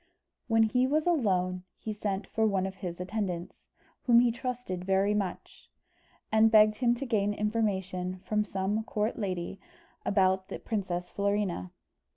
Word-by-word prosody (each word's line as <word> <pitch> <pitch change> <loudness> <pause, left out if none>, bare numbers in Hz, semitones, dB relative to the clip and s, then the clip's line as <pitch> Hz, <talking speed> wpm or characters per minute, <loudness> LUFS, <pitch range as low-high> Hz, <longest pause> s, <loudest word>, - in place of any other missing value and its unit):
When 225 -1 +4
he 250 +4 +2
was 305 +3 +1
alone, 185 - +1
he 215 - -5
sent 205 -2 -3
for 220 +2 +1
one 195 -2 +1
of 190 0 -5
his 180 -2 -5
attendants, 180 -2 -4 0.4
whom 235 -1 +7
he 245 -1 +3
trusted 240 -6 -4
very 195 +2 +2
much, 200 -3 -4 0.6
and 220 0 +5
begged 215 -1 +6
him 240 -2 +3
to 275 - -4
gain 205 -4 +1
information 190 -4 -1
from 210 +2 +1
some 200 +2 -1
court 215 +1 -1
lady 185 -2 -3 0.4
about 190 -1 +2
the - - -4
princess 185 -5 -3
Florina. 200 - -1
205 Hz, 150 wpm, -29 LUFS, 185-220 Hz, 0.6 s, whom